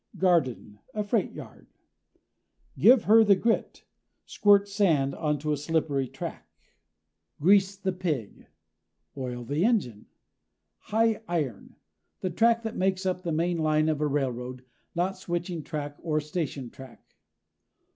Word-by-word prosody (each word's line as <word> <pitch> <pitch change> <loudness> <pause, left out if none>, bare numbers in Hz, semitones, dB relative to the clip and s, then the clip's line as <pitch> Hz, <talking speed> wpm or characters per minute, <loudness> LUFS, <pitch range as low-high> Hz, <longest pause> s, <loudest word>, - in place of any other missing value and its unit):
GARDEN 145 - +1 0.2
a 210 - 0
freight 205 0 0
yard. - - -12 1.1
GIVE 245 -2 +6
HER 220 +2 +6
THE 200 -2 +5
GRIT 225 +4 -1 0.4
squirt 205 -1 +4
sand 165 -10 +1
onto 150 -1 -1
a 150 - 0
slippery 145 -3 -1
track. - - -8 0.9
GREASE 195 +4 +4
THE 190 -1 -2
PIG 160 - -4 0.7
oil 125 -3 -5
the 145 +7 -1
engine. 185 - 0 0.7
HIGH 225 0 +1
IRON 150 - -3 0.4
the 185 - -3
track 230 +5 +3
that 225 - -4
makes 190 0 0
up 185 -1 -1
the 175 -2 -3
main 170 +2 0
line 155 0 +2
of 155 -1 -1
a 150 - +2
railroad, 130 -3 -3 0.3
not 185 +3 -1
switching 175 -1 -3
track 145 -2 -6
or 155 -2 0
station 150 -5 -4
track. 130 -3 -15
165 Hz, 130 wpm, -27 LUFS, 145-195 Hz, 1.1 s, GIVE